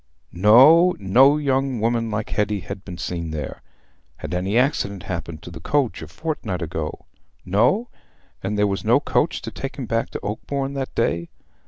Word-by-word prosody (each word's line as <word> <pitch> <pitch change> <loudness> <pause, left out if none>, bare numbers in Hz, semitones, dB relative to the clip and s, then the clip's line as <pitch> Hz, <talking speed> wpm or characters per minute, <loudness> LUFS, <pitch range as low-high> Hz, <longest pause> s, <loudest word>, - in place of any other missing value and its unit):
No! 135 - +7
No 130 +9 +5
young 135 -3 0
woman 115 +1 0
like 105 0 -3
Hetty 105 -1 0
had 95 - -7
been 90 -3 -8
seen 85 -1 -4
there. 75 -4 -5 0.6
Had - - -6
any 95 +5 0
accident 100 - 0
happened 85 -3 -5
to 90 - -9
the 85 - -9
coach 135 - 0
a 80 - -7
fortnight 100 - -4
ago? 80 -1 -5 0.4
No. 120 - +2 0.5
And 105 +2 -2
there 105 - +3
was 100 -1 -2
no - - +4
coach - - 0
to - - -5
take - - -6
him - - -5
back - - -1
to - - -5
Oakbourne 140 -1 -3
that 135 -1 -4
day. 85 -7 0
105 Hz, 175 wpm, -22 LUFS, 90-135 Hz, 0.6 s, No